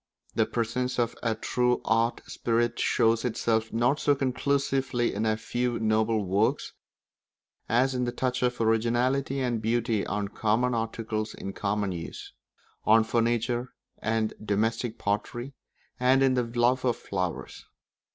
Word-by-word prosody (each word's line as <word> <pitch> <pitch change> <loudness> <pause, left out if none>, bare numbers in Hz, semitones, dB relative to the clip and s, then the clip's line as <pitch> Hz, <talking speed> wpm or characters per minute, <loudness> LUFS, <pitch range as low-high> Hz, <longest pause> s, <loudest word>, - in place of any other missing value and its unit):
The - - +2
presence 125 +2 -1
of 120 -1 0
a 115 -2 0
true 125 +2 +1
art 115 +1 +1
spirit 120 0 0
shows 115 0 +2
itself 115 -2 0
not 120 +6 +2
so 145 - +3
conclusively 135 -2 0
in 110 +2 -1
a 110 0 +1
few 120 +2 -1
noble 110 -1 +1
works 100 +4 0 1.0
as 130 +3 +3
in 125 -1 0
the 120 - -1
touch 125 0 -1
of 125 -1 0
originality 120 +5 +1
and 120 -3 -1
beauty 115 -1 0
on 100 0 -2
common 115 +4 +1
articles 110 -1 -3
in 95 - -6
common 100 -1 -1
use; 85 -2 -7 0.5
on 110 +1 +5
furniture, 120 +2 0 0.2
and 110 -1 0
domestic 110 +3 -1
pottery, 120 +6 -2 0.5
and 130 +2 +4
in 135 -1 +4
the 125 -1 +1
love 120 +2 +1
of 125 -2 +1
flowers. 90 -8 -4
115 Hz, 140 wpm, -27 LUFS, 110-125 Hz, 1.0 s, on